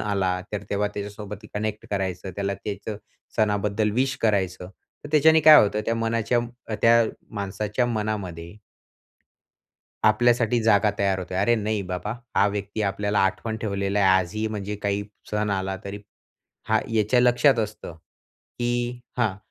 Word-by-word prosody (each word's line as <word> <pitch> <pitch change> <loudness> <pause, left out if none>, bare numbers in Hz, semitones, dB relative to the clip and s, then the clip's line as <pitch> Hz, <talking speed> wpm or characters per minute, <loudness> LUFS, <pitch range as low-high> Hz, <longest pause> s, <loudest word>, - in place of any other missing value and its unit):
आला, 95 -3 0
तर 105 -1 -3
तेव्हा 105 +1 0
त्याच्यासोबत 105 0 -7
कनेक्ट 105 0 -3
करायचं, 95 -2 -2
त्याला 100 0 -1
त्याचं 100 +1 -6 0.4
सणाबद्दल 105 0 +1
विश 130 +3 +1
करायचं. 95 -4 0 0.3
तर - - -6
त्याच्याने 160 +1 +6
काय 155 -1 +9
होतं? 105 +1 0
त्या 115 - +1
मनाच्या 115 +1 0 0.4
त्या 115 0 +6 0.3
माणसाच्या 105 +4 -1
मनामध्ये 100 -7 -3 1.5
आपल्यासाठी 120 +2 +3
जागा 105 -1 +4
तयार 100 -1 +1
होते. 90 0 -6
अरे, 100 +5 +3
नाही 105 -1 -1
बाबा 90 +4 -3 0.2
हा 100 - +5
व्यक्ती 105 +1 -3
आपल्याला 100 +1 0
आठवण 110 +3 -2
ठेवलेला 100 -2 -2
आहे 95 - +5
आजही 110 +5 -3
म्हणजे 105 -1 -4
काही 100 0 0 0.3
सण 105 0 0
आला 95 -1 -1
तरी 100 +1 -6 0.7
हा - - +3
याच्या 110 +3 +3
लक्षात 125 +2 +4
असतं, 105 -5 -4 0.6
की 120 0 -1 0.2
हा 105 -6 +1
105 Hz, 140 wpm, -24 LUFS, 100-115 Hz, 1.5 s, काय